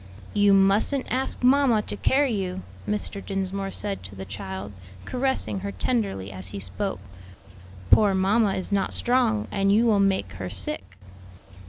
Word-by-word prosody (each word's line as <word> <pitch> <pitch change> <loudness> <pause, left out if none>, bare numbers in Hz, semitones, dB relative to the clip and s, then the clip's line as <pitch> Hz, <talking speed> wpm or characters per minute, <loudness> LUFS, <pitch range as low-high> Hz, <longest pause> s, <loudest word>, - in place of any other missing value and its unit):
"You 205 -1 +4
mustn't 200 +8 +3
ask 260 0 -1
mamma 250 -4 +4
to - - -4
carry 270 +5 +2
you," 190 -2 -3 0.3
Mr. 210 -1 -2
Dinsmore 195 0 -3
said 200 0 -3
to 95 +2 -10
the 95 0 -7
child, 95 0 -6 0.3
caressing 265 -5 -1
her 200 +1 -4
tenderly 200 - -1
as 95 -1 -6
he 100 +1 -6
spoke; 95 -1 -4 0.9
"poor 205 -3 +6
mamma 200 +2 +2
is 190 - -4
not 195 -1 0
strong, 240 -4 +1
and 195 -1 +2
you 220 +4 +4
will 215 -3 +4
make 190 - +1
her 90 -1 -5
sick." 95 -1 -3
195 Hz, 155 wpm, -25 LUFS, -, 0.9 s, poor